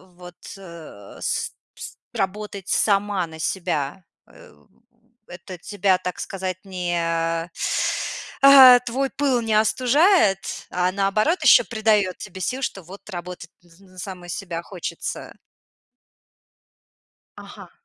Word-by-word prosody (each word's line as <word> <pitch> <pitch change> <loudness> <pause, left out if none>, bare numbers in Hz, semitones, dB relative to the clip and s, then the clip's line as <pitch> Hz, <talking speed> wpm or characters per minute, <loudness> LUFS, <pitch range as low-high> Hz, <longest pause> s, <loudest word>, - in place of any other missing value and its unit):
вот, 180 0 -13 0.2
э, 170 - -12
с - - -2 0.2
пс - - -10 0.2
работать 200 -2 -4
сама 200 -2 +1
на 160 0 -12
себя? 170 -2 -2 0.2
Э - - -18 0.7
в - - -16
это 180 +1 -10
тебя, 190 +1 0
так 180 0 -6
сказать, 185 -2 -4
не 180 -2 -3
а 165 0 -1 1.0
а 265 -3 +10
твой 255 +2 -2
пыл 275 -4 +1
не 225 -1 -1
остужает, 250 - +3 0.3
а, 180 0 0
наоборот, 200 - +1
ещё - - +7
придаёт 215 -5 +1
тебе 190 -2 -9
сил, 255 +9 -2
что 195 -6 -4
вот 195 +5 -13
работать 175 -2 -8
н 180 +2 -21
на 185 - -19
саму 180 0 -8
себя 175 -1 -5
хочется? 180 -3 -6 2.0
Ага. - - -12
190 Hz, 120 wpm, -22 LUFS, 175-215 Hz, 2.0 s, а